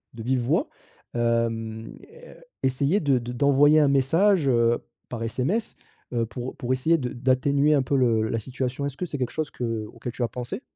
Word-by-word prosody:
de 115 - -7
vive 130 +1 +1
voix», 120 - 0 0.5
hem, 115 -1 -1
é 480 +2 -15 0.3
essayer 140 +9 +2
de 140 -5 +2
d'envoyer 140 +5 +4
un 145 - +4
message, 160 +5 +3
heu, 115 -1 +3 0.3
par 115 -2 -4
SMS, 150 - -2 0.4
heu, 115 -1 +1
pour 125 +2 -6
pour 125 +1 -1
essayer 160 +6 +2
de 125 -4 -3
d'atténuer 140 +4 +2
un 135 - +2
peu 140 - -1
le 115 -4 +3
la 115 - -1
situation, 130 +4 -4
est-ce 140 -1 -5
que 180 - -2
c'est 145 - -4
quelque 125 -1 -1
chose 155 -1 -3
que 115 -3 -3
auquel 120 +1 -6
tu 120 - -3
as - - +1
pensé? 125 - -6
130 Hz, 190 wpm, -25 LUFS, 120-145 Hz, 0.5 s, d'envoyer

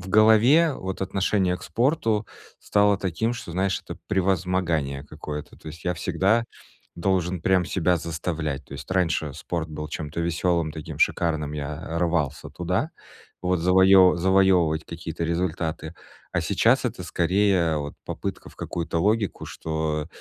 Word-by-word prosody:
в 90 - -9
голове, 110 - +5
вот, 95 0 -5
отношение 95 -1 +1
к - - -15
спорту 115 -5 0 0.3
стало 100 -1 +3
таким, 100 +6 -1
что, 115 -7 -8
знаешь, 95 +2 0
это - - -8
превозмогание 90 -7 0
какое-то, 75 0 -7
то - - -18
есть 80 +2 -10
я 90 - 0
всегда 95 +7 +1 0.5
должен 90 -1 0
прям 95 -1 +3
себя 90 0 +1
заставлять. 80 -3 -3
То - - -13
есть 70 -1 -9
раньше 80 -5 0
спорт 80 0 -4
был 75 0 -6
чем-то 75 +2 -4
веселым, 85 -1 0
таким 80 -1 -7
шикарным, 75 -3 +1
я 75 +3 -4
рвался 75 -4 -1
туда, 90 - -1 0.5
вот, 90 -1 +1
завоевы 95 +1 +6
завоевывать 90 -3 +3
какие-то 85 0 -6
результаты. 85 -1 -2 0.4
А - - +1
сейчас - - +2
это - - -3
скорее 90 -2 +2
вот 75 0 -5
попытка - - -5
в - - -21
какую-то 85 -1 -3
логику, 105 +2 0
что 80 -1 -3
85 Hz, 145 wpm, -25 LUFS, 80-95 Hz, 0.5 s, завоевы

